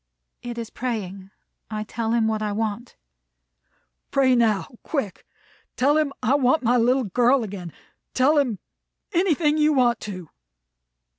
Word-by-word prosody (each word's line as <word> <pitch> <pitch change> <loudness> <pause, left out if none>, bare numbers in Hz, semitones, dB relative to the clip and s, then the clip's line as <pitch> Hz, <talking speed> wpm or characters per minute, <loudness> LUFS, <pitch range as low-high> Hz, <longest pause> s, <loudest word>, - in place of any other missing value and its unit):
"It 240 -1 -6
is 230 -1 -6
praying. 195 -6 -5 0.4
I 215 -1 -3
tell 225 +1 -3
Him 230 -2 +2
what 220 -1 -1
I 210 -1 -2
want." 220 +2 -3 1.1
"Pray 265 -2 +3
now, 220 -4 +2 0.2
quick. 270 - -4 0.5
Tell 285 +3 +3
him 305 -2 +1
I 245 - +3
want 270 +1 +2
my 240 +1 +3
little 250 +3 +3
girl 245 +5 +2
again. 190 -5 -7 0.4
Tell 290 +4 +4
him 245 -7 0 0.6
anything 325 -4 +2
you 305 0 +4
want 245 -3 +3
to." 185 -6 -8
240 Hz, 140 wpm, -23 LUFS, 215-275 Hz, 1.1 s, Tell